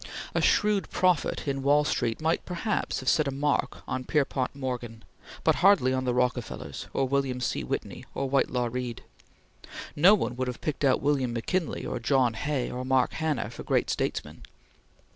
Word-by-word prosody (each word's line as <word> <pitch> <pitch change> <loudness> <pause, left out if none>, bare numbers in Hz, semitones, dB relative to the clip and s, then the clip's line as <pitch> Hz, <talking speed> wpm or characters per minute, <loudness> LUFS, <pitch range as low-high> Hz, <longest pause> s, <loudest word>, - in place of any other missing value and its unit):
A - - +1
shrewd 210 -2 +2
prophet 180 -3 +1
in 135 -1 -1
Wall 145 +2 +4
Street 120 -6 -1
might 160 +2 0
perhaps 185 0 -2
have 130 - -10
set 155 +1 +3
a - - 0
mark 140 +2 -1
on 130 - -2
Pierpont 135 -2 0
Morgan, 125 -4 -5 0.4
but - - +3
hardly 185 -10 +5
on 130 0 -1
the 125 - +1
Rockefellers 125 -1 -2
or 135 - 0
William 135 -1 0
C. 125 - -2
Whitney - - -4
or 135 - -1
Whitelaw 125 -2 +1
Reid. 125 -1 -4 0.9
No 185 +8 +7
one 125 - -2
would 130 0 -1
have 125 - -4
picked 150 -1 -3
out 135 -1 +3
William 135 -4 +1
McKinley 160 +9 -2
or - - -3
John 125 0 +2
Hay 140 +2 -2
or 125 +1 -4
Mark 130 0 +2
Hanna 145 -9 -1
for - - -8
great - - +1
statesmen. - - -3
135 Hz, 175 wpm, -27 LUFS, 125-150 Hz, 0.9 s, No